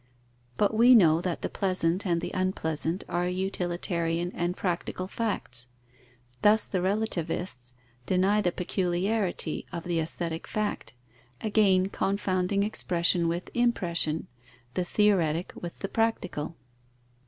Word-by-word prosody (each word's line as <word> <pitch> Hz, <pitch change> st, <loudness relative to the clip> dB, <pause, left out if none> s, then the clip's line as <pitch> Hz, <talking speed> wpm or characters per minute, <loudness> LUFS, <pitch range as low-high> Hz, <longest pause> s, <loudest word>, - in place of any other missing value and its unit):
But 205 Hz, +1 st, +2 dB
we 240 Hz, +3 st, +7 dB
know 165 Hz, -6 st, +6 dB
that 180 Hz, -2 st, -3 dB
the -, -, +1 dB
pleasant 185 Hz, -1 st, 0 dB
and 170 Hz, -1 st, +1 dB
the -, -, -4 dB
unpleasant 175 Hz, -2 st, -1 dB
are 175 Hz, +1 st, 0 dB
utilitarian 175 Hz, -2 st, -1 dB
and 175 Hz, +1 st, -2 dB
practical 185 Hz, 0 st, -2 dB
facts. 185 Hz, -, -1 dB, 0.7 s
Thus 210 Hz, +1 st, +5 dB
the 185 Hz, -, -1 dB
relativists 175 Hz, -, -2 dB, 0.3 s
deny 195 Hz, +3 st, +3 dB
the 175 Hz, -, +1 dB
peculiarity 180 Hz, 0 st, -1 dB
of 170 Hz, -, -5 dB
the 175 Hz, -1 st, 0 dB
aesthetic 165 Hz, 0 st, -3 dB
fact, 215 Hz, -9 st, -3 dB, 0.5 s
again 195 Hz, -3 st, +3 dB
confounding 195 Hz, 0 st, 0 dB
expression 175 Hz, -4 st, +1 dB
with 170 Hz, +2 st, -3 dB
impression, 175 Hz, -10 st, 0 dB, 0.5 s
the 180 Hz, -, -1 dB
theoretic 180 Hz, -5 st, +2 dB
with 175 Hz, -1 st, -7 dB
the 195 Hz, -, -4 dB
practical. 190 Hz, -8 st, -1 dB
180 Hz, 120 wpm, -28 LUFS, 170-200 Hz, 0.7 s, we